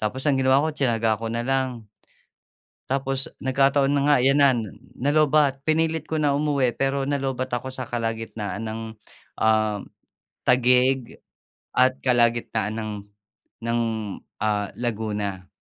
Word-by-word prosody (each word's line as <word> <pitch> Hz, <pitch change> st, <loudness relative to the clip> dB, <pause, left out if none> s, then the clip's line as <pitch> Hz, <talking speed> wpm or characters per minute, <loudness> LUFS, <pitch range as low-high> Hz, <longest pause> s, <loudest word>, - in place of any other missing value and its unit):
Tapos 120 Hz, +6 st, -3 dB
ang 140 Hz, -, +3 dB
ginawa 130 Hz, +2 st, +4 dB
ko, -, -, +1 dB
tsinaga 115 Hz, -5 st, +1 dB
ko 115 Hz, -, -3 dB
na 115 Hz, 0 st, -1 dB
lang. 130 Hz, -3 st, -1 dB, 1.1 s
Tapos 135 Hz, 0 st, -1 dB, 0.2 s
nagkataon 135 Hz, +1 st, +3 dB
na 140 Hz, -1 st, +2 dB
nga 145 Hz, -, +6 dB
'yon 135 Hz, +2 st, +4 dB
na, 140 Hz, -1 st, +6 dB, 0.5 s
na-lowbatt. 145 Hz, -1 st, +3 dB
Pinilit 160 Hz, 0 st, +1 dB
ko 160 Hz, -, -1 dB
na 145 Hz, -, +3 dB
umuwi, 140 Hz, -5 st, +1 dB
pero 135 Hz, 0 st, 0 dB
nalow-batt 135 Hz, -3 st, -1 dB
ako 130 Hz, -, -6 dB
sa 130 Hz, -, -4 dB
kalagitnaan 115 Hz, -3 st, -3 dB
ng, 110 Hz, +1 st, -4 dB, 0.6 s
uhm, 110 Hz, -1 st, +2 dB, 0.7 s
Taguig 125 Hz, 0 st, +3 dB, 0.6 s
at 130 Hz, +1 st, +4 dB
kalagitnaan 120 Hz, -3 st, +1 dB
ng 110 Hz, -1 st, -4 dB, 0.7 s
ng, 115 Hz, 0 st, +1 dB, 0.6 s
ah, 105 Hz, -2 st, 0 dB
Laguna. 105 Hz, -5 st, -3 dB
130 Hz, 125 wpm, -24 LUFS, 115-135 Hz, 1.1 s, nga